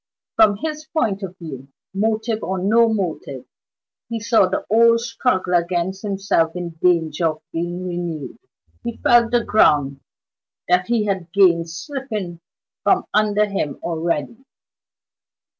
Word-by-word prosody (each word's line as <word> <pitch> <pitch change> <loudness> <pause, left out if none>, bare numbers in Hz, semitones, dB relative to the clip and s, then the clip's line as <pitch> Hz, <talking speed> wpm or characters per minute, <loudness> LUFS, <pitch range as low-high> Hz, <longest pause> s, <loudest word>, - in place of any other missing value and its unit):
From 215 -2 +5
his 305 +4 -5
point 230 -11 -1
of 185 -1 -7
view 135 -7 -9 0.3
motive 220 +2 -1
or 190 - -2
no 225 +5 +3
motive 165 - -3 0.6
he 230 -1 -3
saw 225 -3 +3
the 185 - -3
old 230 +1 +5
struggle 230 -5 -1
against 175 +2 0
himself 195 -5 0
in 175 -1 -4
danger 165 -2 +2
of 155 0 -4
being 175 +2 -3
renewed; 175 -5 -5 0.4
he 235 -1 -5
felt 240 -1 +4
the 240 0 +2
ground 145 -11 +3 0.7
that 180 +1 +2
he 230 -3 +1
had 190 -4 -3
gained 170 -4 +4
slipping 215 - -5 0.4
from - - +2
under 210 0 +3
him 195 -8 -3
already. 170 - -2
190 Hz, 130 wpm, -21 LUFS, 170-225 Hz, 0.7 s, From